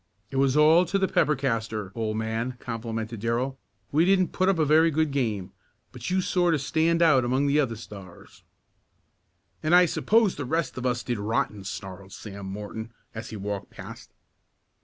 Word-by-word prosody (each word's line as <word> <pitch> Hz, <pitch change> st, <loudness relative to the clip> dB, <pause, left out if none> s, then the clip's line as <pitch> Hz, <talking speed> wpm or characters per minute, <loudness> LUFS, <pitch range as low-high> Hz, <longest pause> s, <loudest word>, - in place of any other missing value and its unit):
"It 135 Hz, -, -3 dB
was 135 Hz, +1 st, +3 dB
all 160 Hz, +3 st, +6 dB
to 190 Hz, +4 st, 0 dB
the 190 Hz, -1 st, +1 dB
pepper 150 Hz, -4 st, +2 dB
castor, 115 Hz, -6 st, -2 dB
old 110 Hz, -1 st, -2 dB
man," 115 Hz, +3 st, -2 dB
complimented 115 Hz, -1 st, -5 dB
Darrell. 120 Hz, +4 st, -1 dB, 0.3 s
"We 155 Hz, +3 st, +4 dB
didn't 185 Hz, 0 st, +3 dB
put 185 Hz, +1 st, +1 dB
up 195 Hz, -, +2 dB
a 155 Hz, -, +2 dB
very 160 Hz, +3 st, +5 dB
good 155 Hz, -1 st, 0 dB
game, 110 Hz, -9 st, -2 dB, 0.4 s
but -, -, -6 dB
you 185 Hz, +1 st, +2 dB
sort 175 Hz, -2 st, +2 dB
of 145 Hz, -, -2 dB
stand 165 Hz, +4 st, +2 dB
out 145 Hz, -6 st, +5 dB
among 130 Hz, +3 st, +1 dB
the 145 Hz, +1 st, +3 dB
other 125 Hz, -6 st, 0 dB
Stars." 100 Hz, -5 st, -12 dB, 1.2 s
"And 155 Hz, +3 st, +3 dB
I 180 Hz, 0 st, +7 dB
suppose 215 Hz, +3 st, +2 dB
the 145 Hz, -, -3 dB
rest 160 Hz, +2 st, -1 dB
of 130 Hz, 0 st, -2 dB
us 125 Hz, -1 st, -1 dB
did 120 Hz, -3 st, -2 dB
rotten!" 105 Hz, -1 st, -1 dB
snarled 95 Hz, 0 st, -7 dB
Sam 100 Hz, -2 st, -8 dB
Morton 105 Hz, +3 st, -6 dB, 0.2 s
as 110 Hz, 0 st, -7 dB
he 110 Hz, -, -7 dB
walked 100 Hz, -1 st, -5 dB
past. -, -, -11 dB
125 Hz, 180 wpm, -26 LUFS, 110-160 Hz, 1.2 s, I